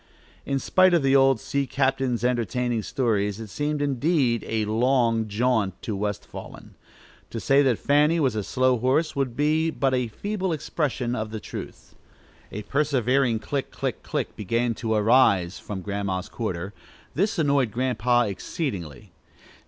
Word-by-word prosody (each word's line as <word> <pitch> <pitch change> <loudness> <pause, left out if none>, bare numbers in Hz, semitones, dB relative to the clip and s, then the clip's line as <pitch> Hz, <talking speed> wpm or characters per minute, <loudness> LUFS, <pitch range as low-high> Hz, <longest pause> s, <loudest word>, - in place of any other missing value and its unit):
In 140 - 0
spite 185 +6 +4
of 165 - +2
the 135 0 +3
old 135 -3 +5
sea 140 +3 -2
captain's 130 -4 0
entertaining 120 -1 0
stories, 105 -5 -1
it 110 -2 -7
seemed, 150 0 -1
indeed, 140 -3 +1
"a 110 -1 0
long 115 0 +2
jaunt" 110 -3 0
to 110 - -3
West 105 0 -3
Wallen. - - -10 0.6
To 115 - -5
say 135 +5 +4
that 130 -5 +2
Fanny 150 +4 +3
was 135 -6 +2
a 105 - -1
slow 130 +2 +1
horse 135 +7 +1
would 135 -4 -1
be 155 +3 +2
but 135 -4 0
a 125 -2 +1
feeble 190 - -3
expression 135 -5 -2
of 110 -1 -3
the 110 0 -5
truth. - - -9 0.6
A 105 - -5
persevering 135 -3 +1
"click! 130 +6 -3
click! - - -4
click!" - - -3
began 115 +4 0
to 110 -1 -2
arise 105 -5 +3
from 100 -3 -6
Grandma's 100 -2 -3
quarter. 100 -4 -4 0.4
This 200 +6 0
annoyed 140 -6 +2
Grandpa 120 +1 +1
exceedingly. 100 - -5
125 Hz, 150 wpm, -25 LUFS, 110-140 Hz, 0.6 s, old